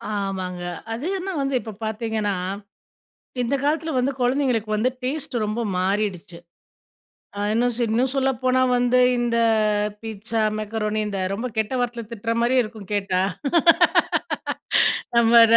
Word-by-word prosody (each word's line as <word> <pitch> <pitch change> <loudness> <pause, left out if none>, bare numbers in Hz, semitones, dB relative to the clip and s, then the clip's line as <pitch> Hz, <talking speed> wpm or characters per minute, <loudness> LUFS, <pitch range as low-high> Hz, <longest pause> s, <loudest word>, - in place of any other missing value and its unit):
ஆமாங்க. 190 -3 -3 0.3
அது 235 +6 -5
இன்ன 385 +2 -4
வந்து 275 0 -1
இப்ப 220 - -8
பாத்தீங்கன்னா, 220 -2 -1 1.1
இந்த 245 +3 0
காலத்துலல 315 +2 0
வந்து 255 +2 +1
கொழந்தைங்களுக்கு 245 -4 +1
வந்து 235 +4 +2
டேஸ்ட் 280 +1 -3
ரொம்ப 215 +3 -2 0.2
மாறிடுச்சு. 190 -1 -1 1.0
அ - - -2
இன்னுஸ் 240 +1 +1
இன்னும் 240 +4 +1
சொல்லப்போனா 260 -1 +1 0.2
வந்து 245 +1 +3 0.2
இந்த 240 -1 0 0.6
பீட்ஸா, 225 0 -3 0.2
மெக்கரோனி 215 0 -2
இந்த 200 -2 -3
ரொம்ப 225 +5 -3
கெட்ட 220 +3 0
வார்த்தையில 240 -3 -3
திட்ற 230 0 -2
மாரியேருக்கும் 235 -5 0
கேட்டா. 195 -2 0 2.0
நம்ம 235 0 +7
230 Hz, 115 wpm, -23 LUFS, 210-250 Hz, 2.0 s, நம்ம